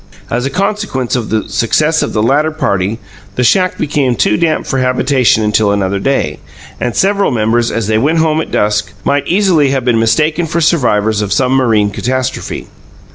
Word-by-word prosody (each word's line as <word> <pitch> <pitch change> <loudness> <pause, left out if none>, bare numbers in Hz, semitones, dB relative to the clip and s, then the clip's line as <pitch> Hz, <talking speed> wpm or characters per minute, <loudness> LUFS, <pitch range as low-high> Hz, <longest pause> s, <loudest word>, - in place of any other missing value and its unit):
As 125 +3 -1
a - - -3
consequence 195 - -2
of 120 -4 -3
the 110 0 -1
success 150 +9 +1
of - - -2
the 105 - 0
latter 145 +6 +2
party, 105 - -1 0.4
the 125 - 0
shack 185 +9 +2
became 140 -4 0
too 105 - +1
damp 160 +5 0
for 135 - -2
habitation 125 -3 +2
until 105 -1 +2
another 100 -1 -1
day, 95 - -1 0.4
and 120 - -2
several 200 +1 +2
members, 115 0 0
as 115 -2 -2
they 110 +1 +1
went 150 +7 +1
home 160 -1 +1
at - - -6
dusk, 105 0 -1
might 140 0 0
easily 180 -7 +2
have 135 -2 -1
been 120 -2 +2
mistaken 155 +9 +1
for 170 +2 -1
survivors 110 -10 +1
of 100 -1 -3
some 130 -2 +1
marine 115 -6 +2
catastrophe. 130 +4 -3
125 Hz, 185 wpm, -13 LUFS, 110-155 Hz, 0.4 s, latter